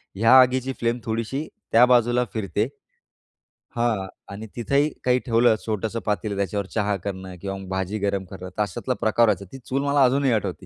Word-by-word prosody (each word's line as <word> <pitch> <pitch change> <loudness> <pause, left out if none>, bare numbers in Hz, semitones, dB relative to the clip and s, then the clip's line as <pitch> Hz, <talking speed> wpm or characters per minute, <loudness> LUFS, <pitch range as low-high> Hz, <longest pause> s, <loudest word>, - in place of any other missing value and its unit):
ह्या 115 +5 +4
आगीची, 130 +1 +1
फ्लेम 120 +1 0
थोडीशी 115 +6 -3 0.2
त्या 120 +2 +7
बाजूला 120 0 +3
फिरते. 105 +1 -1 1.1
हां 115 -5 0 0.3
आणि 110 +2 -7
तिथंही 140 +6 +1
काही 125 0 +3
ठेवलं 115 -1 +4
छोटंसं 110 +1 -2
पातेलं, 105 -1 -1
त्याच्यावर 100 0 -1
चहा 105 -2 +1
करणं 95 -2 -5
किंवा 95 0 -4
मग 95 -1 -9
भाजी 95 +2 -2
गरम 100 -1 -1
करणं, 95 -1 -9
तर - - +1
अशातला 105 +6 -3
प्रकार 115 +1 +3
व्हायचा. 100 -2 0
ती - - -7
चूल, 135 +3 -2
मला 140 -1 +3
अजूनही 135 0 +2
आठवते. 110 - -2
110 Hz, 175 wpm, -24 LUFS, 100-125 Hz, 1.1 s, त्या